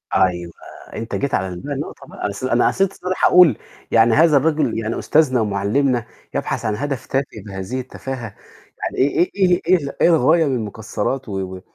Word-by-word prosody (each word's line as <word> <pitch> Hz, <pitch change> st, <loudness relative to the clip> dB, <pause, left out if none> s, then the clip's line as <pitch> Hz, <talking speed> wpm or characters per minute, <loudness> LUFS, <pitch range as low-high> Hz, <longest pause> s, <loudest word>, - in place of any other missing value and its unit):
أيوه، 85 Hz, -2 st, +1 dB, 0.4 s
أنت 115 Hz, +1 st, -5 dB
جيت 140 Hz, -1 st, -2 dB
على 95 Hz, -1 st, -1 dB
بقى -, -, -4 dB
النقطة -, -, -7 dB
بقى -, -, -13 dB
أنا -, -, -1 dB
قص 100 Hz, +3 st, -7 dB
أنا 120 Hz, -2 st, +2 dB
قصدت 195 Hz, 0 st, +1 dB
الصراحة 185 Hz, -1 st, 0 dB
أقول 175 Hz, -, +6 dB, 0.3 s
يعني 115 Hz, 0 st, +5 dB
هذا 155 Hz, -1 st, +5 dB
الرجل 155 Hz, 0 st, +1 dB
يعني 110 Hz, +1 st, -3 dB
أستاذنا 135 Hz, -6 st, +2 dB
ومعلمنا 110 Hz, +5 st, 0 dB, 0.3 s
يبحث -, -, -2 dB
عن 110 Hz, -, 0 dB
هدف 140 Hz, +1 st, -4 dB
تافه 135 Hz, +1 st, 0 dB, 0.2 s
بهذه 95 Hz, +6 st, -5 dB
التفاهة، 130 Hz, -4 st, -7 dB, 0.5 s
يعني -, -, -4 dB
إي 175 Hz, +5 st, +1 dB
إيه 185 Hz, -3 st, +3 dB
إيه 175 Hz, -6 st, +3 dB
إيه -, -, +6 dB
الغاية 160 Hz, +1 st, +4 dB
من 135 Hz, -3 st, 0 dB
المكسرات 110 Hz, +3 st, -3 dB
و 95 Hz, -1 st, -3 dB, 0.2 s
و 95 Hz, -, -10 dB
130 Hz, 180 wpm, -20 LUFS, 105-155 Hz, 0.5 s, أقول